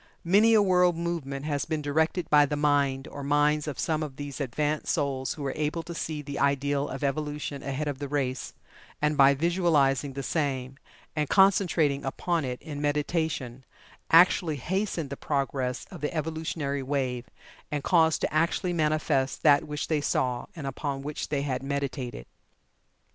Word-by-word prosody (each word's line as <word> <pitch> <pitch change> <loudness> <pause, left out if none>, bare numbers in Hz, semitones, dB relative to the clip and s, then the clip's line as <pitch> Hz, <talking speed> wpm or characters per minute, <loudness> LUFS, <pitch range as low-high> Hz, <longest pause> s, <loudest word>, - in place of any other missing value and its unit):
Many 210 +6 +5
a 210 - +6
world 180 -3 +3
movement 155 -5 -3
has 145 -2 -1
been 155 -2 -2
directed 160 +4 0
by 145 -1 +6
the 150 - -2
mind, 145 -2 +1
or 140 - -8
minds, 145 +1 +2
of 150 - -4
some 160 -2 0
of 150 -4 -5
these 145 0 -6
advanced 150 +3 -1
souls 135 -3 -1
who 150 - -7
were 135 - -2
able 155 +2 -2
to 170 - -7
see 155 -2 -4
the 140 0 -5
ideal 140 +1 +1
of 135 +2 -6
evolution 145 0 -2
ahead 140 +2 -3
of 140 -2 -3
the 145 - -4
race, 130 -3 -2 0.4
and 150 0 +1
by 140 -1 +6
visualizing 150 -4 +2
the 140 0 -5
same, 135 -4 -2 0.4
and 150 -2 -1
concentrating 180 -7 +3
upon 165 +4 -1
it 125 -1 -4
in 145 -3 -6
meditation, 145 -4 -1 0.5
actually 165 -1 +5
hastened 170 - -2
the - - -3
progress 135 -3 -2
of - - -9
the 150 - -1
evolutionary 155 -3 -2
wave, 130 -3 -2 0.4
and 145 -2 -2
caused 160 -3 +3
to - - -1
actually 170 +3 +1
manifest 150 -4 0
that 145 -2 +5
which 150 -1 -3
they 155 -2 +1
saw, 125 -3 -1
and 155 -4 -6
upon 135 0 -3
which 150 +1 -4
they 140 -2 -1
had 130 -3 -2
meditated. 135 - -4
145 Hz, 170 wpm, -27 LUFS, 140-160 Hz, 0.5 s, a